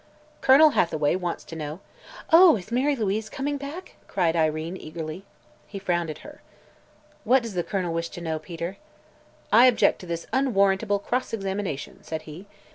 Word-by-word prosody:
"Colonel 295 +4 +7
Hathaway 155 - +1
wants 175 -2 -3
to 165 - -10
know 155 +1 -6 0.3
" - - -16
"Oh, 340 -2 +9
is 210 +1 -8
Mary 270 +4 +2
Louise 220 -1 -2
coming 285 +1 -3
back?" 285 +7 -8
cried 170 -4 0
Irene 160 +1 0
eagerly. 160 +2 -7 0.4
He 200 - -8
frowned 175 -4 -1
at 155 - -8
her. 300 0 -12 0.8
"What 245 +2 +3
does 230 -3 -6
the 180 - 0
Colonel 180 -2 -2
wish 165 0 -2
to - - -6
know, 160 -2 -3
Peter?" 170 +4 -6 0.8
"I 240 +4 +8
object 245 -3 +3
to 180 - -10
this 170 0 -4
unwarrantable 205 -5 +2
cross 250 +5 -3
examination," 195 -8 -4
said 160 -1 -6
he. 160 +6 -11
190 Hz, 170 wpm, -25 LUFS, 165-240 Hz, 0.8 s, Oh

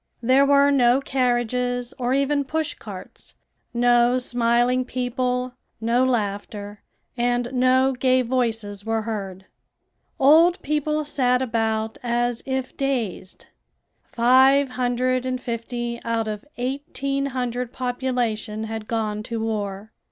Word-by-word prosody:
There 265 +3 +4
were 280 0 +5
no 250 -2 +4
carriages 245 -2 -1
or 245 0 -1
even 280 +1 +1
push 315 +3 -2
carts; - - -11 0.4
no 240 0 +3
smiling 245 +1 +1
people, 250 0 -2 0.3
no 235 +3 +2
laughter, 205 -3 -2 0.3
and 245 +1 0
no 260 +1 +3
gay 255 0 +2
voices 225 -5 -1
were 225 0 -1
heard. 195 -4 -5 0.7
Old 325 +7 +6
people 300 +1 -1
sat 250 -3 +1
about 220 -2 -1
as 240 0 -1
if 265 -1 -3
dazed. 235 -9 -3 0.6
Five 265 +3 +4
hundred 250 0 0
and 255 0 -2
fifty 235 0 -4
out 230 -1 -1
of 210 +2 -5
eighteen 275 +2 -2
hundred 250 -2 -3
population 245 -4 -2
had 220 -1 -5
gone 215 -2 -2
to 230 +1 -5
war." 210 -2 -3
245 Hz, 115 wpm, -23 LUFS, 225-260 Hz, 0.7 s, Old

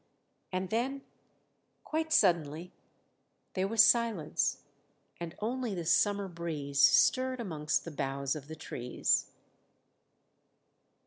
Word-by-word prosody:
and 185 0 -3
then, 265 +5 -1 0.8
quite 315 0 -2
suddenly, 170 - +2 0.8
there 190 0 0
was 220 0 +6
silence, 230 -10 +1 0.6
and 170 -1 -6
only 235 -1 -2
the 170 -2 -4
summer 200 +4 +2
breeze 160 -5 -4
stirred 255 - +4
amongst 155 -8 -2
the 170 - -6
boughs 140 -1 -2
of 145 -2 -8
the 160 - -7
trees. 125 -5 -1
175 Hz, 105 wpm, -31 LUFS, 150-225 Hz, 0.8 s, was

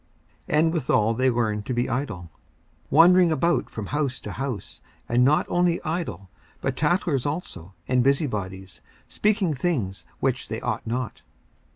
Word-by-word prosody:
54:005:013 - - +2
And 160 +1 +3
withal 115 -8 +2
they 130 +3 +2
learn 110 -4 0
to 115 +5 -4
be 120 +1 +1
idle, 115 - -3 0.6
wandering 175 +3 +6
about 170 +3 +1
from 110 - -6
house 140 0 -1
to 105 - -6
house; 125 -2 -5 0.3
and 120 +1 +3
not 145 +4 +4
only 175 -1 +2
idle, 155 - -3 0.3
but 135 -1 -2
tattlers 150 -3 +1
also 95 - -5
and 125 -1 +3
busybodies, 100 - -1 0.3
speaking 205 -6 +1
things 130 - -2
which - - -1
they - - -3
ought - - -3
not. 125 +1 -3
130 Hz, 150 wpm, -25 LUFS, 110-160 Hz, 0.6 s, wandering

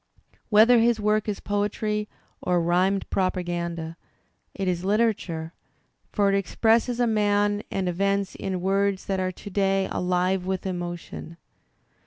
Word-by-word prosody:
Whether 230 +3 +6
his 230 0 +3
work 210 0 +1
is 205 - -3
poetry 210 +1 -1 0.3
or 180 -1 +1
rhymed 180 +3 +1
propaganda, 170 -3 -2 0.6
it 195 -1 -2
is 180 -1 -1
literature, 195 -6 0 0.6
for 205 -2 +2
it - - +3
expresses 225 +5 +2
a 245 - +4
man 205 -2 +2
and 190 -1 -2
events 195 +2 0
in 185 -2 -4
words 195 +1 +1
that 195 -1 -1
are 185 0 0
to 195 - -10
day 195 0 +1
alive 180 +1 0
with 190 0 -2
emotion. 175 -2 -5
195 Hz, 135 wpm, -25 LUFS, 180-210 Hz, 0.6 s, Whether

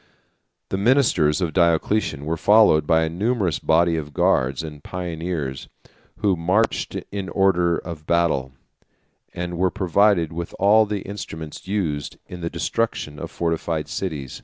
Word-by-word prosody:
The 95 - -2
ministers 100 - +3
of 85 -3 -1
Diocletian 85 -2 +1
were 80 +2 -1
followed 100 -5 +5
by 80 -1 +4
a - - 0
numerous 95 -1 0
body 85 +1 +2
of 75 -2 -6
guards 65 +5 +2
and 75 -2 -9
pioneers, 85 -6 -4 0.5
who 100 -3 +3
marched 90 - 0 0.2
in 100 -2 -4
order 90 -2 +2
of 80 -3 -8
battle, 85 -6 +1 0.8
and 90 -1 -5
were 95 0 +3
provided 90 -1 +2
with 85 0 -5
all 105 +2 +5
the 100 -2 -3
instruments 80 -6 -8
used 85 -8 -2
in 90 -1 -9
the 85 - -2
destruction 85 -3 -2
of - - -6
fortified 80 -2 -2
cities. 75 -9 -5
85 Hz, 140 wpm, -22 LUFS, 80-95 Hz, 0.8 s, followed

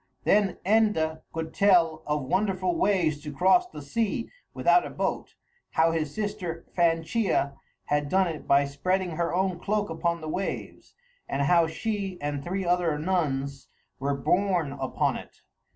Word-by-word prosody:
Then 200 -3 +3
Enda 190 -7 +2
could 160 0 -5
tell 175 -6 +4
of 150 -1 0
wonderful 185 +3 0
ways 165 -5 +1
to 150 0 -6
cross 190 - +4
the 145 - -9
sea 225 - -2 0.2
without 355 - +3
a - - -5
boat, - - -3 0.4
how 165 +1 +4
his 155 -3 -1
sister 205 -4 -4
Fanchea 165 -2 +1 0.3
had 145 0 0
done 190 +3 +3
it 160 -3 -6
by 140 0 +5
spreading 180 +6 -1
her 170 +1 -1
own 185 -1 0
cloak 205 0 -1
upon 170 +1 -1
the 155 - -7
waves, 185 +5 -5 0.3
and 140 +1 0
how 170 +3 +4
she 195 +2 -3
and 145 -1 -3
three 190 +3 -2
other 175 -3 +1
nuns 140 -5 -1 0.3
were 140 +1 0
borne 180 0 +1
upon 135 -2 -1
it. - - -13
170 Hz, 150 wpm, -27 LUFS, 150-190 Hz, 0.4 s, by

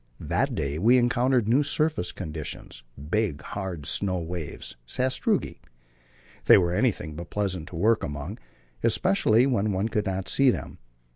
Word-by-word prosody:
That - - -1
day 70 +2 -2
we 120 +7 +5
encountered 120 -1 +2
new 125 +6 +4
surface 150 - 0
conditions 75 -7 -6 0.3
big, 105 -9 0
hard 95 -7 -5
snow 95 +2 +1
waves 85 -2 -6
(sastrugi). 130 - 0 0.9
These - - +8
were 85 -2 +1
anything 100 -7 0
but 85 +3 -8
pleasant 95 -5 -2
to 90 - -9
work 110 +6 +2
among, 75 0 -5 0.4
especially 110 +5 +3
when 110 -6 +1
one 95 +4 -1
could 105 -2 -1
not 95 0 -2
see 135 -1 +4
them. - - -3
100 Hz, 145 wpm, -26 LUFS, 85-120 Hz, 0.9 s, These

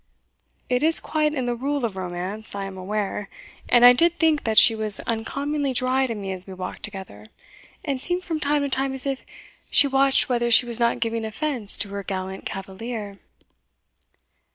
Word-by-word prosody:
It 250 0 0
is 320 +2 +6
quite 305 -1 -1
in 260 -3 -2
the 245 - -1
rule 275 +2 -2
of 215 -4 -4
romance, 185 +4 -5
I 200 -1 -4
am 195 -1 -8
aware; 200 +1 -4 0.4
and 240 0 +6
I 245 - +10
did 340 +6 +3
think 320 -3 +2
that 220 -1 -1
she 230 - +8
was 215 -2 +1
uncommonly 275 +5 -2
dry 255 +2 +1
to 230 - -4
me 195 -2 -5
as 185 0 -2
we 190 - -9
walked 185 0 -7
together, 190 - -8 0.6
and 275 -4 -2
seemed 355 +4 0
from 325 -3 -3
time 290 -1 0
to 280 - -2
time 270 0 -1
as 265 - -4
if 270 -1 -3 0.5
she - - +5
watched 270 0 +2
whether 240 -1 0
she 235 +1 +6
was 240 -1 -1
not 235 0 +1
giving 230 -1 -1
offence 225 -1 -2
to 205 - -2
her 200 0 -5
gallant 190 -1 -5
cavalier." 200 +1 -7
235 Hz, 190 wpm, -23 LUFS, 200-275 Hz, 0.6 s, I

